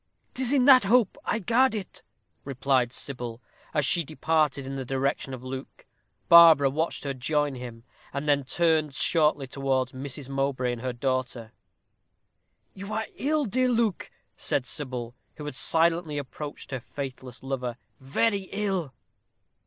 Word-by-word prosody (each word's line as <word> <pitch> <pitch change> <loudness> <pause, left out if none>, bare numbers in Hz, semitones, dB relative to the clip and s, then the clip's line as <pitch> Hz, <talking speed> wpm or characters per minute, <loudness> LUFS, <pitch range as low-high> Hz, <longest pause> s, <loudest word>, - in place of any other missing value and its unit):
"'Tis 260 -1 0
in 270 -3 +3
that 260 -5 +7
hope 225 -1 +3
I - - 0
guard 235 +3 +2
it," 200 -4 -7 0.4
replied 135 -2 0
Sybil, 120 -4 -3 0.3
as 150 -3 +1
she 170 +5 +4
departed 155 -2 0
in 135 +1 -5
the 135 - -4
direction 135 +1 -2
of 130 -1 -7
Luke. 130 +1 -8 0.4
Barbara 165 -5 +8
watched 160 +4 -2
her 140 -1 -2
join 145 +2 0
him, 120 -2 -9 0.3
and 140 +2 -4
then 140 -1 +3
turned 155 0 +1
shortly 150 -4 +2
towards 130 -1 -1
Mrs. 135 +1 -6
Mowbray 135 -2 -1
and 120 - -7
her 130 0 -2
daughter. 125 -2 -3 1.2
"You 195 +2 -8
are 220 +1 -2
ill, 300 +1 0
dear 255 +4 +1
Luke," 230 -5 0 0.3
said 135 - -1
Sybil, 125 -4 -2 0.2
who 150 - -8
had 150 - -5
silently 165 +2 +2
approached 145 +1 -7
her 130 - -3
faithless 130 -1 -8
lover; 125 -3 -3 0.2
"very 195 +9 0
ill." 195 -8 -2
140 Hz, 145 wpm, -26 LUFS, 130-170 Hz, 1.2 s, Barbara